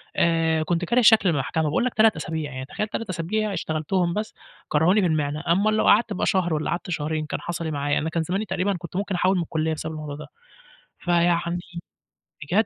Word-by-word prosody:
آآ 165 -1 +2
كنت 175 +2 -1
كاره 240 +6 +3
شكل 220 -4 +6
المحكمة، 160 +1 0
باقول 155 +10 +1
لَك 255 - -1
3 220 0 +4
أسابيع 160 -2 -4
يعني، 130 -1 -6
تخيّل 210 +9 -3
3 225 0 -5
أسابيع 200 +5 -1
اشتغلتهم 170 +1 -1
بس 210 +3 -3 0.4
كرّهوني 175 +8 +3
في 185 - +2
المهنة، 150 -1 -1
أمّال 200 +6 +3
لو - - +2
قعدت 225 0 +4
بقى 185 - -1
شهر 185 -5 +1
والّا 155 0 -1
قعدت 175 +1 -3
شهرين، 155 -1 -2
كان - - -4
حصَل 170 -1 -4
إيه 160 - -2
معايا، 145 0 0
أنا 160 - -2
كان 165 0 -1
زماني 190 +6 -2
تقريبًا 200 0 -1
كنت 170 0 -10
ممكن 200 0 -1
أحُوِّل 185 +2 +2
من 175 - 0
الكُلّيّة 160 -1 -1
بسبب 160 +1 -5
الموضوع 150 -2 -6
ده. 150 - -9 0.7
فيعني 175 0 +1 0.8
بجد، 145 +6 -2
170 Hz, 210 wpm, -24 LUFS, 155-190 Hz, 0.8 s, شكل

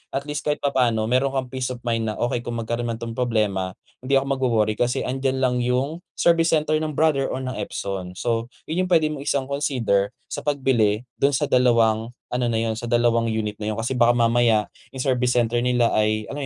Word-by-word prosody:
at 140 - -1
least 150 0 -3
kahit 150 - +1
papaano 125 -6 +2
meron 130 +2 +3
kang 130 -1 -3
peace 130 -1 -2
of 125 - -5
mind 115 -1 0
na 105 - -3
okey 120 0 0
kung 120 0 -5
magkaroon 120 +1 -2
man 115 - -2
to 115 - -9
ng - - -5
problema 105 -6 0 0.3
hindi 135 +2 +1
ako 135 - 0
magwo-worry, 115 -5 +1
kasi 125 +2 +1
'andiyan 130 +1 -1
lang 125 -1 +2
yung 130 +7 -1 0.2
service 165 -1 +3
center 155 0 0
ng 155 -2 -3
Brother 150 -4 +2
or - - -3
ng 130 0 -4
Epson. 95 -3 -5
So, 115 +2 -1 0.2
yun 180 +4 -1
yung - - -13
pwede 160 -3 +4
mong 140 -2 -6
isang 140 -2 +1
consider 125 -8 0 0.2
sa - - -3
pagbili 125 -7 +1 0.2
dun 140 +1 +3
sa 150 - 0
dalawang 115 -2 +3 0.2
ano 125 0 0
na 115 -1 0
yun, 115 -1 -1
sa 120 - -5
dalawang 120 -1 +2
unit 105 -1 -2
na 110 0 -3
yun - - -7
kasi 120 +3 -2
baka 120 0 +5
mamaya 115 -2 +3 0.3
yung 130 - -4
service 125 -2 +1
center 120 -1 +1
nila 125 -2 +3
ay, 110 0 0
alam 145 0 -4
120 Hz, 220 wpm, -23 LUFS, 115-135 Hz, 0.3 s, baka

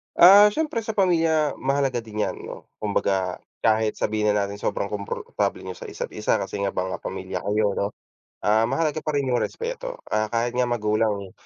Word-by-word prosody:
Ah, 200 +4 +9
siyempre 310 -5 -1
sa 220 0 -4
pamilya 165 -6 +2
mahalaga 135 -2 +1
din 110 -2 -3
yan - - -3
'no - - -10
kumbaga 95 -3 0 0.2
kahit 110 -1 +2
sabihin 105 -1 +1
na 105 -1 +1
natin 100 0 -6
sobrang - - -1
komportable 100 -1 -3
niyo 95 -1 -6
sa - - -9
isa't - - -6
isa - - +1
kasi 100 - -4
nga 100 -1 0
mga 95 0 -2
pamilya - - -4
kayo 105 -1 +1
'no, 100 - 0 0.6
ah, 110 +2 +4
mahalaga 150 +4 0
pa 155 0 -2
rin 140 -2 0
yung 125 -1 +2
respeto. - - -4
Ah, 110 0 +1
kahit 120 +1 0
nga 125 -1 +2
magulang, 105 -4 0
115 Hz, 185 wpm, -24 LUFS, 105-155 Hz, 0.6 s, Ah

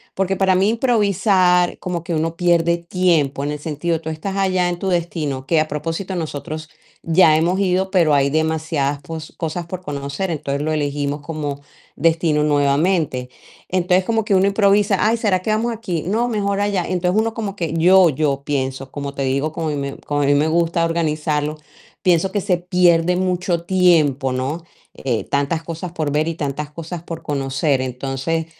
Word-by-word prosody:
porque 195 0 0
para 190 0 +3
mí 190 +3 +3
improvisar 200 -6 +2
como 175 -2 -4
que 170 -2 -3
uno 160 +1 -1
pierde 170 -1 +2
tiempo 170 -6 +1
en 145 - -2
el 150 - -4
sentido, 160 +2 -2
tú 160 - -5
estás 175 +5 -4
allá 185 -2 +1
en 175 0 -3
tu 190 - -2
destino, 160 -6 -2
que 160 +3 +2
a 155 - +1
propósito 165 +6 -4
nosotros 155 -1 -5 0.3
ya 165 -2 +5
hemos 175 +4 +1
ido, 190 0 +1
pero 170 -6 +3
hay 140 -1 +3
demasiadas 155 -2 -1
pos 160 -2 -8
cosas 165 +1 -3
por 185 +1 -6
conocer, 145 +3 -4
entonces 140 -3 -3
lo 155 +1 -1
elegimos 145 -1 -2
como 145 -2 -5 0.3
destino 160 -1 +2
nuevamente, 145 -2 +1 0.4
entonces 185 0 +2
como 225 -2 0
que 205 - +1
uno 190 +1 +4
improvisa: 200 0 +3
"Ay, 225 +2 +2
¿será 200 -5 +1
que 215 - -1
vamos 225 +3 0
aquí?, 185 -8 -3
no, 230 +5 +1
mejor 200 -3 -1
allá", 205 -3 0
entonces 180 +3 +1
uno 225 0 -2
como 205 -3 -4
que 165 -4 -3
yo 180 +2 +6
yo 140 -1 -1
pienso, 135 -2 -3
como 140 -1 -5
te 140 - -2
digo, 135 +4 0
como 160 +1 -3
a - - 0
mí - - -2
me 140 0 -4
como 145 0 -2
a - - +2
mí 140 - +4
me 150 +2 +2
gusta 170 +1 +1
organizarlo, 155 -2 -1 0.5
pienso 180 +1 +3
que 205 - 0
se 185 -2 +1
pierde 175 -1 +3
mucho 180 -2 -1
tiempo, 160 -8 +3
¿no?, 135 +6 -3 0.3
eh, 120 -4 -2
tantas 145 +4 -1
cosas 170 +1 -6
por 155 -4 -2
ver 150 +2 +1
y 165 - -2
tantas 145 -1 -4
cosas 165 +2 -7
por 165 -1 -7
conocer, 135 0 0
entonces 135 +5 -2
165 Hz, 185 wpm, -20 LUFS, 145-185 Hz, 0.5 s, yo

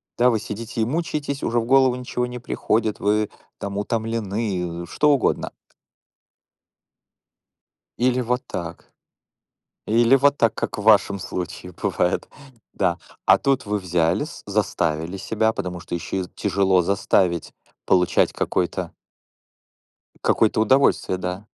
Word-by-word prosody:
да, 125 +1 +4
вы 115 -3 +1
сидите 110 +2 -5
и - - +2
мучаетесь, 145 -1 -2
уже 120 0 +1
в 115 - -2
голову 130 0 +4
ничего 125 0 -3
не 125 0 -7
приходит, 110 -2 -1
вы 105 +1 +1 0.3
там 100 0 -4
утомлены, 105 -6 -2
что 150 - +1
угодно. 140 - +1 2.5
Или 125 +1 +2
вот 125 +1 -1
так. 85 -2 -7 0.9
Или 115 +3 +4
вот 140 +1 +3
так, 115 -2 +3
как - - -4
в 105 - -4
вашем 100 -2 +4
случае 90 0 -6
бывает, 90 - -1 0.5
да. - - 0 0.3
А - - +6
тут 135 -3 0
вы 105 0 -1
взялись, 85 -3 -1
заставили 80 +4 -1
себя, 110 +3 0
потому 90 -1 -4
что 85 - -5
ещё 85 +2 -4
и 90 - -8
тяжело 95 -2 +2
заставить 90 -2 +1 0.3
получать 90 -1 +3
какое-то 90 -2 -1 1.3
какое-то 110 -1 +3
удовольствие, 120 -4 +3
да. 90 +3 -5
105 Hz, 125 wpm, -23 LUFS, 90-120 Hz, 2.5 s, А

